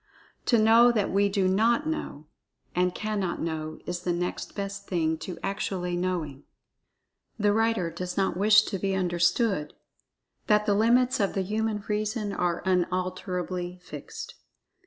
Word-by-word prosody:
To 235 Hz, -, +5 dB
know 225 Hz, +2 st, +6 dB
that 215 Hz, -4 st, 0 dB
we 200 Hz, +1 st, +3 dB
do 195 Hz, -2 st, +1 dB
not 230 Hz, +9 st, +2 dB
know, 310 Hz, -, -4 dB, 0.5 s
and 180 Hz, 0 st, +1 dB
cannot 210 Hz, -4 st, -2 dB
know, 155 Hz, -1 st, -4 dB
is 175 Hz, 0 st, -3 dB
the 180 Hz, 0 st, -2 dB
next 175 Hz, +1 st, -3 dB
best 200 Hz, 0 st, -5 dB
thing 160 Hz, -3 st, 0 dB
to 180 Hz, 0 st, -6 dB
actually 190 Hz, -3 st, -2 dB
knowing. 175 Hz, -6 st, -3 dB, 0.9 s
The 205 Hz, -1 st, +2 dB
writer 225 Hz, -6 st, +1 dB
does 180 Hz, +2 st, -5 dB
not 195 Hz, -3 st, +1 dB
wish 210 Hz, +3 st, +6 dB
to 195 Hz, -3 st, -4 dB
be 195 Hz, +1 st, 0 dB
understood, 175 Hz, -1 st, +1 dB, 0.7 s
that 210 Hz, -1 st, +3 dB
the 205 Hz, -, +3 dB
limits 240 Hz, +4 st, +3 dB
of 200 Hz, -2 st, 0 dB
the 195 Hz, -, +1 dB
human 215 Hz, +1 st, -2 dB
reason 210 Hz, 0 st, -1 dB
are 175 Hz, -2 st, -1 dB
unalterably 180 Hz, 0 st, -1 dB
fixed. 450 Hz, -, -8 dB
195 Hz, 145 wpm, -27 LUFS, 180-215 Hz, 0.9 s, know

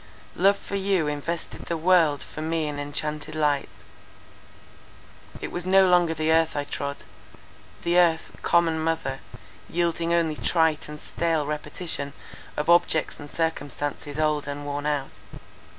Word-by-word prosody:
Love 195 Hz, +3 st, +4 dB
for 200 Hz, -, -6 dB
you 195 Hz, -4 st, +1 dB
invested 150 Hz, +3 st, -4 dB
the 170 Hz, -, -2 dB
world 160 Hz, -4 st, +4 dB
for 155 Hz, -, -8 dB
me 160 Hz, 0 st, -1 dB
in 145 Hz, -1 st, -4 dB
enchanted 150 Hz, +1 st, -3 dB
light; 150 Hz, -2 st, +1 dB, 1.7 s
it -, -, -5 dB
was 175 Hz, -, -3 dB
no 190 Hz, +1 st, +5 dB
longer 175 Hz, -2 st, +4 dB
the 155 Hz, 0 st, +1 dB
earth 160 Hz, 0 st, +3 dB
I 145 Hz, -, 0 dB
trod—the 145 Hz, +4 st, -4 dB
earth, 165 Hz, -2 st, +2 dB
common 165 Hz, -2 st, +3 dB
mother, 160 Hz, -4 st, -1 dB, 0.5 s
yielding 170 Hz, 0 st, 0 dB
only 165 Hz, -2 st, +2 dB
trite 160 Hz, -3 st, +1 dB
and 150 Hz, 0 st, -7 dB
stale 165 Hz, -2 st, -1 dB
repetition 150 Hz, -1 st, -4 dB, 0.4 s
of 150 Hz, -, -1 dB
objects 170 Hz, -2 st, +3 dB
and 145 Hz, -1 st, -9 dB
circumstances 145 Hz, -2 st, -3 dB
old 155 Hz, -2 st, +1 dB
and 145 Hz, 0 st, -5 dB
worn 145 Hz, +1 st, -3 dB
out. 145 Hz, -2 st, -2 dB
160 Hz, 135 wpm, -25 LUFS, 145-170 Hz, 1.7 s, no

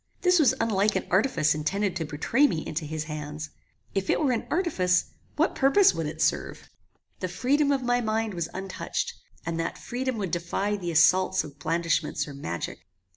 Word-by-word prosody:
This 360 Hz, -1 st, +4 dB
was 280 Hz, -7 st, +4 dB
unlike 210 Hz, -2 st, +2 dB
an 190 Hz, -, -1 dB
artifice 175 Hz, -, +3 dB
intended 190 Hz, +6 st, -1 dB
to 165 Hz, -, -2 dB
betray 165 Hz, -, +2 dB
me 160 Hz, -, -3 dB
into 155 Hz, 0 st, -3 dB
his 155 Hz, +1 st, -3 dB
hands. 150 Hz, 0 st, -6 dB, 0.4 s
If 195 Hz, -1 st, -2 dB
it -, -, +3 dB
were 285 Hz, -4 st, +2 dB
an 235 Hz, -, -2 dB
artifice, 185 Hz, -, +2 dB, 0.3 s
what -, -, +2 dB
purpose 380 Hz, +9 st, +5 dB
would -, -, -2 dB
it -, -, -2 dB
serve? -, -, -1 dB, 0.5 s
The 185 Hz, -, -2 dB
freedom 280 Hz, +10 st, +1 dB
of 270 Hz, -2 st, +1 dB
my 245 Hz, 0 st, +2 dB
mind 220 Hz, -1 st, -1 dB
was 170 Hz, -2 st, -3 dB
untouched, 190 Hz, 0 st, -3 dB, 0.3 s
and 165 Hz, 0 st, -2 dB
that 165 Hz, -, -2 dB
freedom 255 Hz, 0 st, -3 dB
would 195 Hz, -5 st, -3 dB
defy 175 Hz, +4 st, -1 dB
the 180 Hz, -4 st, -4 dB
assaults 170 Hz, +3 st, +4 dB
of 145 Hz, -1 st, -11 dB
blandishments 160 Hz, -1 st, 0 dB
or 145 Hz, -, -8 dB
magic. 85 Hz, -11 st, -5 dB
185 Hz, 180 wpm, -27 LUFS, 160-245 Hz, 0.5 s, purpose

